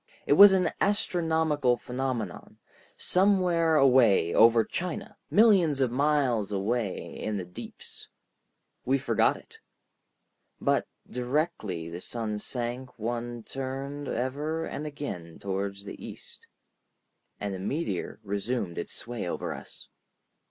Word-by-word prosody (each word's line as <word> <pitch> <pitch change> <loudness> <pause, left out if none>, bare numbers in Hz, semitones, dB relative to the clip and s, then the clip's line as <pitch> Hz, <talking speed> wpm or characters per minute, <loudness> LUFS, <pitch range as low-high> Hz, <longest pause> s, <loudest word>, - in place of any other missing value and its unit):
It - - +4
was 200 +6 +10
an 185 -1 +2
astronomical 160 -9 +1
phenomenon, 125 -7 -4 0.4
somewhere 180 -4 +3
away 125 - +5
over 115 0 +6
China, 175 +8 -4
millions 195 -10 +5
of 130 -3 +2
miles 130 -6 +1
away 105 +1 -2
in 110 -1 -2
the 95 - -4
deeps. 90 +1 -10 0.8
We 135 +2 +2
forgot 135 - +2
it. 445 -1 -17 1.0
But - - +1 0.2
directly 125 - -2
the 85 +2 -7
sun 110 -2 -3
sank 125 +3 -4
one 120 +1 -4
turned 135 +3 -5
ever 150 +7 -2
and 150 - -5
again 115 - -6
toward 100 0 -3
the 100 0 -9
east, - - -11 0.9
and 100 -1 -3
the 95 - -5
meteor 100 - -3
resumed 100 -2 -2
its - - -6
sway 115 -6 -5
over - - -3
us. - - -10
125 Hz, 115 wpm, -28 LUFS, 105-150 Hz, 1.0 s, was